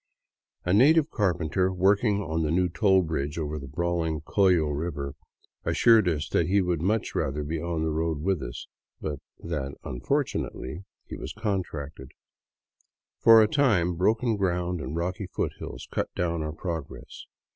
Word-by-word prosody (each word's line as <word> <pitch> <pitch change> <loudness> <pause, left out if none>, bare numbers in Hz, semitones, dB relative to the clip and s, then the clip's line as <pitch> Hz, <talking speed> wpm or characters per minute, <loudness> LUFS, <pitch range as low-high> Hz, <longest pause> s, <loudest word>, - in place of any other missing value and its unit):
A 90 - +2
native 150 +8 +5
carpenter 90 -2 +1
working 100 +3 +2
on 80 -2 -2
the 75 - 0
new 90 +2 +2
toll 95 +1 +3
bridge 75 -3 -3
over 75 -1 -3
the 70 - -8
brawling 80 0 -1
Collo 90 0 +3
river 75 -2 -3 0.5
assured 115 -4 +4
us 75 -4 -1
he 90 +5 +2
would 90 -4 0
much 105 +5 0
rather 75 +3 -1
be 80 +2 -3
on 85 -2 -2
the 80 - 0
road 80 0 -1
with 95 -4 0
us, - - -6 0.3
but 75 -3 -4 0.2
that 70 -5 -3
" - - -41
unfortunately,'* 95 - -3 0.2
he - - -7
was - - -6
contracted. 80 - -4 1.1
For 115 -1 +8
a - - +3
time 105 - +2
broken 110 +6 +1
ground 90 -3 -1
and 65 +4 -5
rocky 90 +3 -2
foothills - - -5
cut - - -1
down 85 -2 -1
our 75 0 -3
progress. 85 -3 -6
85 Hz, 155 wpm, -27 LUFS, 75-95 Hz, 1.1 s, For